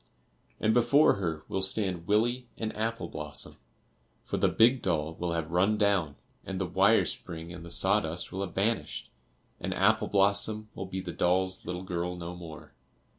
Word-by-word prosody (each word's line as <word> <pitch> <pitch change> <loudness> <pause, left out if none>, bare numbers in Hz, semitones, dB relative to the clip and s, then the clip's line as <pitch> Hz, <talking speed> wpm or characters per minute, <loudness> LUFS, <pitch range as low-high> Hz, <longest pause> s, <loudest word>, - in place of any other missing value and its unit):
and 110 - +2
before 120 +3 +5
her 80 -5 -3
will 95 - -2
stand 95 -3 +1
Willie 120 +4 +1
and 110 -1 -3
Apple 115 +2 -2
blossom. 75 -1 -3 0.7
For - - -2
the - - +3
big 120 +3 +4
doll 80 -3 0
will 85 +1 -3
have 80 -1 -3
run 95 +5 +3
down, 100 -8 +1 0.3
and 95 -1 -5
the 95 - 0
wire 95 +5 +4
spring 85 0 -7
and 85 - -9
the 85 - -9
sawdust 90 -2 +1
will 95 - -4
have 95 -3 -5
vanished, 110 +4 -1 0.5
and - - -3
Apple 110 +2 +3
blossom 105 +2 +2
will 95 - -6
be 95 0 -4
the - - -6
doll's 95 +1 0
little 90 +1 -4
girl 90 -1 -3
no 90 0 -6
more. 85 -3 -10
95 Hz, 175 wpm, -29 LUFS, 85-105 Hz, 0.7 s, before